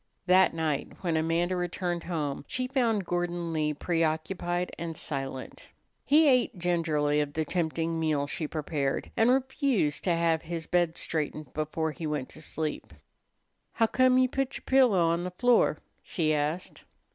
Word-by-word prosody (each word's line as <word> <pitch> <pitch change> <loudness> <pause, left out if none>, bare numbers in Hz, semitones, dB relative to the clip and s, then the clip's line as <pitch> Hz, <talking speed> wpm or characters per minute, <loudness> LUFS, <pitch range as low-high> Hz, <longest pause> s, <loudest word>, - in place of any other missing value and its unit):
That 185 +1 +5
night 155 -3 -2
when 170 -3 0
Amanda 165 +3 +1
returned 175 -1 -2
home 150 -6 -3
she 255 - -2
found 235 -7 +1
Gordon 175 -1 -2
Lee 155 -1 +1
preoccupied 170 +3 -1
and 165 -2 -5
silent. 135 -3 -5 0.3
He 305 +2 +5
ate 250 -5 +3
gingerly 160 -4 +1
of 145 -1 -3
the 160 +1 -1
tempting 165 0 -1
meal 155 -3 +1
she 150 +2 -4
prepared, 150 -3 -2
and 225 +2 +4
refused 260 - +1
to 175 -3 +3
have 165 -1 +1
his 165 -1 -5
bed 175 -2 +1
straightened 155 -3 -3
before 155 +1 -2
he 160 0 -5
went 150 -4 -3
to 155 - -9
sleep. 155 - -4 0.8
"Huccome 255 +3 +3
you 255 0 +5
put 270 +1 -2
yer - - -14
pillow 255 -9 +4
on 170 +1 0
the 180 - -3
floor?" 240 +7 +3 0.2
she 155 -4 0
asked. 150 +5 -2
170 Hz, 155 wpm, -28 LUFS, 155-185 Hz, 0.8 s, That